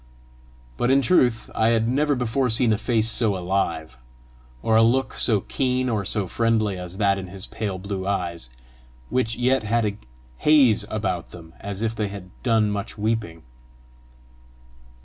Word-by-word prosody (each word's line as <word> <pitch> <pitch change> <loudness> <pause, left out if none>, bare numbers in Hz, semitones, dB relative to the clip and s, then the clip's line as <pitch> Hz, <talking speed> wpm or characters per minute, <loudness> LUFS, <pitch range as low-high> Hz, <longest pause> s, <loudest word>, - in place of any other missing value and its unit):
But 120 - +1
in 135 +1 +4
truth 125 -10 +2
I 110 - +2
had 115 -1 +2
never 145 +4 +2
before 125 +1 0
seen 110 0 +2
a - - +1
face 115 -3 +1
so 110 -3 0
alive, 90 -6 -2 0.7
or 110 - +2
a 110 - +6
look 125 +4 +2
so 110 -5 +2
keen 130 +1 -1
or 110 -3 0
so 100 +1 -1
friendly 110 0 +1
as 90 0 -7
that 100 -2 +2
in 95 - -7
his 95 +1 -6
pale 100 -4 -4
blue 95 0 -5
eyes, 85 -8 -3 0.6
which 115 -3 0
yet 125 +1 +2
had 115 +1 +1
a 100 -1 -2 0.4
haze 130 -9 +4
about 95 -5 -2
them 80 -2 -13
as 100 +1 -5
if 115 0 0
they 105 -2 -2
had 100 -2 -9
done 110 -4 +2
much 100 +1 -4
weeping. 105 -7 -2
110 Hz, 165 wpm, -23 LUFS, 95-120 Hz, 0.7 s, a